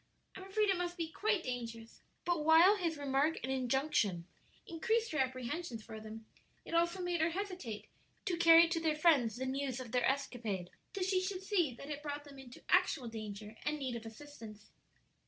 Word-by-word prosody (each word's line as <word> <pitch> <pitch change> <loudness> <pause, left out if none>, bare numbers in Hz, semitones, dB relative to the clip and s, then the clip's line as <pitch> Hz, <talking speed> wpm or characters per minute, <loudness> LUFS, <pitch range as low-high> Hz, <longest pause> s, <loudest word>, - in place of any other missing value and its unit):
I'm 380 - -8
afraid 415 +2 +1
it 380 - +1
must 350 0 -3
be 330 -2 -2
quite 425 -2 0
dangerous." 230 -2 -6 0.2
But 345 -3 +1
while 330 +6 +7
his 335 -5 -1
remark 285 +2 +1
and 260 - -2
injunction 255 - +1 0.4
increased 450 +7 0
her 310 - -1
apprehensions 255 0 -2
for 220 - -8
them, 220 +1 -9 0.4
it - - -8
also 340 +2 +2
made 350 -2 0
her 320 - +3
hesitate 360 - -5 0.4
to 370 -4 0
carry 335 0 +8
to 330 0 -1
their 320 -2 +1
friends 290 -9 +4
the 260 +2 -3
news 265 -1 -2
of 245 -3 -7
their 250 0 +2
escapade 230 -9 -3 0.2
till 385 - -2
she 375 0 +2
should 375 0 -3
see 350 - +1
that 280 +5 -8
it 295 0 -4
brought 290 -1 -5
them 280 -2 -13
into 250 -2 -12
actual 250 -6 +2
danger 215 -1 -7
and 300 +1 -1
need 260 -4 -3
of 230 -1 -6
assistance. 225 -4 -11
290 Hz, 190 wpm, -34 LUFS, 240-340 Hz, 0.4 s, carry